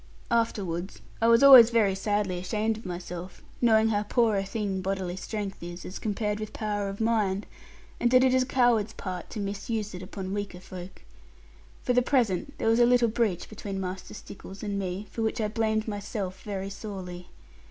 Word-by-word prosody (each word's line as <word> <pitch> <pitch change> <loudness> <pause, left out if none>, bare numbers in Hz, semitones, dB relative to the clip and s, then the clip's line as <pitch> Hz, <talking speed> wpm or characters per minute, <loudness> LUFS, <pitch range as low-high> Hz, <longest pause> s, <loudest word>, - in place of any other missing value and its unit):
Afterwards, 195 -6 -1 0.2
I 230 - +4
was 230 +2 +6
always 260 -4 +11
very 220 -5 +3
sadly 195 -2 -1
ashamed 215 +4 -1
of 220 -2 -9
myself, 175 0 -7 0.2
knowing 220 -2 +5
how 205 -2 +1
poor 220 +1 +2
a 195 - +1
thing 195 -1 -2
bodily 190 -2 -2
strength 200 0 -5
is, 175 +1 -7
as 185 - -7
compared 210 0 -2
with 215 -1 -6
power 205 -2 -2
of 195 - -7
mind, 215 -3 +1 0.5
and 240 - +3
that 255 +1 +6
it 260 -1 +4
is 260 - +4
a - - +1
coward's 240 -5 +2
part 180 -2 -6
to 215 - -6
misuse 205 +1 -3
it 180 - -7
upon 190 0 -6
weaker 205 -3 -4
folk. 185 0 -10 0.8
For 250 - +1
the 250 - +4
present 245 -2 0
there - - -1
was 225 +1 +4
a 240 - +7
little 245 -1 +4
breach 215 -6 0
between 200 -2 -6
Master 185 +1 -5
Stickles 195 -1 -10
and 200 -1 -2
me, 190 +1 -3
for 230 - -4
which 220 0 -1
I 215 -1 0
blamed 220 0 0
myself 205 -2 -4
very 195 -2 -4
sorely. 185 -4 -7
205 Hz, 190 wpm, -27 LUFS, 190-225 Hz, 0.8 s, always